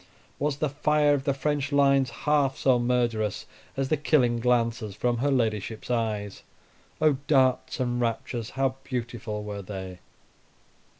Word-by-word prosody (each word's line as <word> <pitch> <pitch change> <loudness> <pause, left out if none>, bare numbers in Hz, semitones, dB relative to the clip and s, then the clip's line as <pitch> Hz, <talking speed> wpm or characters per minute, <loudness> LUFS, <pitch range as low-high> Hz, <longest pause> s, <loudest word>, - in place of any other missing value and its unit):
Was 145 0 0
the 155 - 0
fire 150 +1 +2
of 140 -1 -1
the 140 - +2
French 140 0 -1
lines 140 -2 +4
half 145 +1 +1
so 130 -2 +3
murderous 120 -4 0 0.3
as 135 -1 -1
the 155 - +2
killing 125 -5 +2
glances 115 -4 0
from 120 +2 0
her 145 +4 +1
ladyship's 110 -3 -1
eyes? 105 -4 -2 0.6
Oh! 150 -3 +3
darts 130 0 +2
and 120 -1 -1
raptures, 115 0 -2
how 135 -1 +1
beautiful 115 -4 -4
were 105 -1 -5
they! 95 -2 -7
125 Hz, 140 wpm, -26 LUFS, 115-140 Hz, 0.6 s, lines